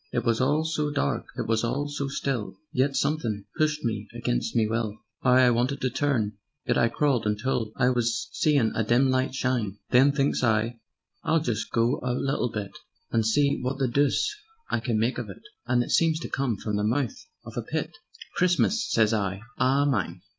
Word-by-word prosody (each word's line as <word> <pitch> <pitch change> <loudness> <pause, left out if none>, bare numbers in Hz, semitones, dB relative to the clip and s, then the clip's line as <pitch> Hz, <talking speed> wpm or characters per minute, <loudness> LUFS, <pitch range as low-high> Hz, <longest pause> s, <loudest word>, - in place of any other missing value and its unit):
"It 120 -1 -1
was 115 0 +2
all 150 +4 +2
so 155 -2 -1
dark, 145 - -1
it - - -2
was 115 0 +1
all 140 +5 -1
so 145 -1 -3
still; 135 -5 -3 0.2
Yet 135 +2 +1
somethin' 120 -10 -1
pushed 150 -1 0
me 110 -3 -2
against - - -1
me 115 -2 +4
will; 110 -1 -2 0.3
'Ow 125 - +3
I 125 -1 +6
wanted 125 +4 0
to 130 - 0
turn! 115 -7 0 0.3
Yet 120 -2 +1
I 115 - +3
crawled 125 -4 +1
until 110 +1 -1
I 125 - +3
was 120 +8 0
seein' 140 -8 +2
a 110 - 0
dim 125 +4 +3
light 130 0 0
shine. 120 -7 -1
Then 135 +3 +6
thinks 140 -2 0
I: 115 0 +1 0.4
'I'll 160 0 +2
just 115 -7 -2
go 115 +3 +1
a 125 -1 -1
little 135 -2 0
bit, 105 -3 -4 0.4
And 115 - +2
see 140 +7 +2
wot 130 +2 -2
the 135 -1 +1
doose 140 - +2 0.4
I - - +1
can 115 -1 -1
make 115 +4 0
of 115 -4 -5
it,' 95 - -11 0.2
And 120 0 +3
it - - -6
seemed 165 -1 +3
to - - -5
come 130 -6 -1
from 105 0 -2
the 105 - 0
mouth 120 +2 -1 0.2
of - - -9
a - - -1
pit: - - -3 0.4
'Christmas!' 185 +6 +2
sez 110 -1 +3
I, 100 -2 -1 0.2
'a - - +3 0.2
_MINE.' 90 -11 -1
125 Hz, 200 wpm, -26 LUFS, 110-140 Hz, 0.4 s, I